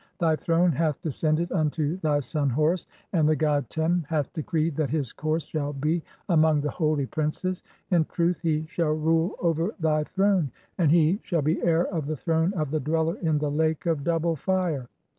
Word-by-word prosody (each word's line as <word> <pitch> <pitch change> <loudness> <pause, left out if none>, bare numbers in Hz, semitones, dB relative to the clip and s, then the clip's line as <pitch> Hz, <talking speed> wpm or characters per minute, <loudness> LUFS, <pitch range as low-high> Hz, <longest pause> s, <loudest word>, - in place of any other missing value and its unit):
"Thy 165 -4 +2
throne 170 +2 +2
hath 155 -1 0
descended 155 +2 0
unto 155 -1 0
thy 150 -5 +1
son 145 0 -1
Horus, 155 +7 +1 0.3
and 155 -4 +3
the 155 - +3
god 145 -5 0
"Tem 165 +2 0
hath 150 -4 -1
decreed 160 0 -1
that 155 -4 0
his 145 -4 -2
course 155 +1 -1
shall 145 -2 -3
be 155 +5 0 0.3
among 160 -4 +4
the 150 0 -2
holy 155 -4 0
"princes. 160 +6 -2 0.3
(15) - - +4
In 160 - +3
truth, 170 0 0
he 160 -2 0
shall 160 -1 0
rule 160 +3 +1
over 170 +4 0
thy 155 -2 +2
throne, 190 -3 +1 0.3
and 165 -4 +4
he 170 +4 +4
"shall 165 -5 -1
be 155 +4 +1
heir 170 0 +3
of 160 -6 -3
the 155 0 -2
throne 165 +4 +1
of 155 -5 -2
the 155 - 0
Dweller 160 +3 0
in 160 -4 +1
the 150 -1 -1
Lake 160 +2 0
of 160 -4 0
"Double 165 +1 +1
Fire. 170 -5 -1
160 Hz, 195 wpm, -26 LUFS, 150-170 Hz, 0.3 s, among